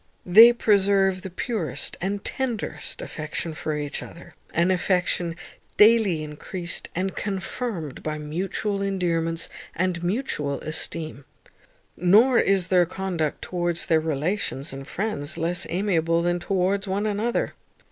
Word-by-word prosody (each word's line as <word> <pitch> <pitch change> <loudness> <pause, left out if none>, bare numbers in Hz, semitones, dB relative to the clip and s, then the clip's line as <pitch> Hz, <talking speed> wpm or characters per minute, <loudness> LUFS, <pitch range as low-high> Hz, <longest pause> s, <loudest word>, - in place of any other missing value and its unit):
They 220 +6 +9
preserve 195 -4 +3
the 190 - -6
purest 170 - -3
and 200 +2 -2
tenderest 250 -5 -3
affection 155 +1 -5
for 155 0 -3
each 145 -1 -3
other, 170 0 -11 0.2
an 170 +3 +2
affection 180 -2 +1 0.4
daily 210 -7 +5
encreased 170 +3 -4
and 185 +2 -1
confirmed 195 - -4
by 155 0 -3
mutual 190 +6 -2
endearments 170 -4 -1 0.3
and 175 -1 -1
mutual 175 - -1
esteem. 155 -2 -4 0.7
Nor 220 +9 +5
is 190 -2 +2
their 180 -2 +4
conduct 180 -4 -2
towards 175 -1 -1
their 160 - +3
relations 155 -1 -2
and 135 0 -8
friends 170 -7 -3
less 170 +2 0
amiable 170 -3 +1
than 175 0 +1
towards 195 +2 0
one 195 +2 -1
another. 215 +3 0
180 Hz, 125 wpm, -25 LUFS, 165-200 Hz, 0.7 s, They